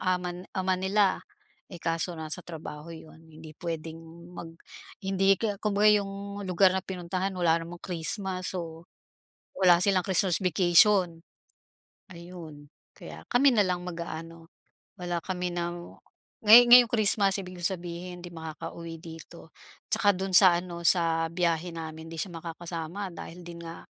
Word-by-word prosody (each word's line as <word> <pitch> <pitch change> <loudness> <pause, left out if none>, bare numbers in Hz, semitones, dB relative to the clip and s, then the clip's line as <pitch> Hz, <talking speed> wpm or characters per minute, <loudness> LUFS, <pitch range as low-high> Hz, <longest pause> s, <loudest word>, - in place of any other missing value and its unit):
aman 180 -1 -2
ama 185 0 +1
nila, 195 +1 +1 0.5
eh, 175 - -9
kaso 165 +1 -2
nasa 160 +3 -5
trabaho 160 -1 -9
'yon, 160 0 -14
hindi 155 0 -12
puwedeng 165 -1 -6 0.4
mag 165 -1 -8 0.5
hindi 195 0 +3
k'ya 210 -3 -2
kumbaga 210 0 +3
yung 200 +1 -7
lugar 185 +1 +4
na 190 - -1
pinuntahan, 185 +1 -4
wala 170 -2 +2
namang 170 +1 -10
Christmas, 185 +2 -3
so 165 -2 -6 0.7
wala 180 -2 +6
silang 185 -2 +2
Christmas 190 -1 +2
vacation. 180 0 +4 0.9
Ayun, 170 -4 -11 0.3
kaya - - -11
kami 270 +3 +5
na 210 - +4
lang 180 -1 -2
mag-aano, 165 -1 -7 0.5
wala 175 -1 -2
kami 180 -2 -3
ng 175 0 -5 0.5
ngay 225 +3 +10
ngayong 245 -1 +9
Christmas, 205 -3 +2
ibig 185 -1 -9
kong 175 - +1
sabihin, 175 +1 -8
'di 175 - -9
makakauwi 165 +1 -8
dito 165 0 -12 0.4
'tsaka 205 -1 +4
do'n 190 0 -4
sa 180 -2 +7
ano, 175 -1 -7
sa 165 -2 +2
biyahe 170 0 -1
namin, 160 0 -8
di 165 - -8
siya 190 - -4
makakasama 170 +3 -6
dahil 170 +1 -9
din 170 -1 -9
nga 165 0 -9
175 Hz, 145 wpm, -27 LUFS, 165-190 Hz, 0.9 s, ngay